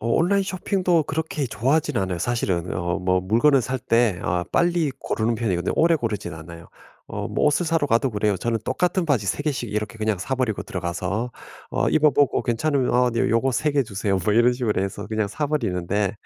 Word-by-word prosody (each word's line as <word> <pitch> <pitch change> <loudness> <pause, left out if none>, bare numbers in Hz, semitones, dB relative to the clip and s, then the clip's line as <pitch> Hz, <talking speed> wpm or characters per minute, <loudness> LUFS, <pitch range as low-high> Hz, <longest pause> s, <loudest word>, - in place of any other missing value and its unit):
어 - - -4
온라인 195 +9 +2
쇼핑도 185 -3 0
그렇게 155 -1 -2
좋아하진 140 +6 0
않아요 95 -2 -2
사실은. 90 -5 -1
어 85 -1 -1
뭐 90 0 +1
물건을 120 +9 +3
살 130 +2 -2
때 115 -5 +2
아 90 +1 -1
빨리 170 -3 +2
고르는 115 -2 -1
편이거든요. 100 -6 -1
오래 165 +1 +4
고르진 110 - -3
않아요. 85 +1 -11 0.4
어 - - -4
뭐 - - +1
옷을 150 +4 +2
사러 160 -2 +1
가도 120 +2 +2
그래요. 105 -2 0
저는 115 +4 -1
똑같은 180 +5 0
바지 130 -10 +1
3 120 - -1
개씩 125 -7 -2
이렇게 105 +2 -3
그냥 110 -2 0
사 125 +8 -2
버리고 125 -5 -1
들어가서 95 +6 -3 0.4
어 - - +1
입어 155 -1 +4
보고 140 0 +2
괜찮으면 130 +2 0
"아 125 0 +4
네 115 - -1
요거 115 +4 +2
3 125 +7 +1
개 140 -1 +3
주세요." 100 -4 -1
뭐 105 - +2
이런 120 +2 +5
식으로 120 -5 -1
해서 100 +1 -4
그냥 110 -1 0
사 150 +8 -2
버리는데 100 - -1
115 Hz, 410 characters per minute, -23 LUFS, 100-145 Hz, 0.4 s, 이런